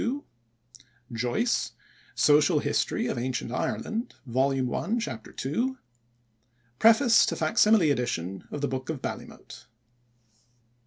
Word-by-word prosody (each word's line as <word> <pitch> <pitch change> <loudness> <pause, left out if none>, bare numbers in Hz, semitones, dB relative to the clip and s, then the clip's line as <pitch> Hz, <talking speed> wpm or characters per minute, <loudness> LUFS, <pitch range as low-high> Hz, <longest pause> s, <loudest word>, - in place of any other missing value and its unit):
II; 275 +5 -2 0.9
Joyce: 125 - -1 0.4
Social 150 0 +4
History - - 0
of - - -2
Ancient 120 -1 -3
Ireland, 220 - -3
vol. 130 +1 0
I, 225 +4 -1
Chap. 125 - -5
2; 240 - -2 1.0
Preface 225 +1 +6
to - - -1
fac 155 -1 -1
simile 210 -8 +5
edition 95 -8 -3
of 145 - -5
the 145 - +1
Book 130 +1 -5
of 160 -4 -3
Ballymote. - - -8
145 Hz, 115 wpm, -27 LUFS, -, 1.0 s, Preface